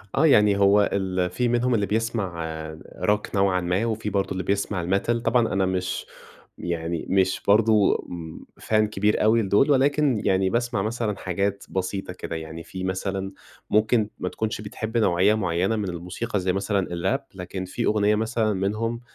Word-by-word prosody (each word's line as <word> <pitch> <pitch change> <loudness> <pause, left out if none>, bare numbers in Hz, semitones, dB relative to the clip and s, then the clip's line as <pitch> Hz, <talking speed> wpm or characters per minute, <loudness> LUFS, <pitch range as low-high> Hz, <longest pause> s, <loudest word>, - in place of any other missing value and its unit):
آه، - - +4
يعني 105 -7 +5
هو 100 +1 +4
ال 95 -2 0
في 125 +7 -1
منهم 120 +1 +1
اللي 105 -2 +1
بيسمع 105 -6 -2 0.6
Rock 105 0 0
نوعًا 95 -2 +2
ما 90 +6 0
وفي 110 -2 -2
برضو 100 -1 -1
اللي 95 -1 -2
بيسمع 100 -2 -1
الMetal، 100 +6 +1
طبعًا 115 0 +2
أنا 95 0 +2
مش 95 0 -2 0.5
يعني 85 -1 -3
مش 95 -1 +2
برضو 105 0 +4
امم 85 -2 -7 0.2
Fan 110 - -1
كبير 105 0 +1
أوي 115 +2 +4
لدول 105 +8 +3
ولكن 140 -3 +3
يعني 95 0 +2
باسمع 120 -3 0
مثلًا 110 -1 -2
حاجات 100 +2 -2
بسيطة 95 0 -3
كده؛ 90 - -8
يعني 80 +1 -7
في 95 +2 -7
مثلًا 95 +1 -2 0.4
ممكن 110 0 +2
ما 90 - -2
تكونش 110 -1 -3
بتحب 110 +2 -4
نوعية 100 -2 +3
معيّنة 95 +1 0
من 105 -3 -2
الموسيقى 90 +6 -3
زي 90 0 0
مثلًا 100 0 0
الRap 95 +11 -1 0.2
لكن 95 +1 -5
في 115 +6 -3
أغنية 105 0 +3
مثلًا 110 0 0
منهم 110 +5 -2
100 Hz, 165 wpm, -24 LUFS, 95-110 Hz, 0.6 s, يعني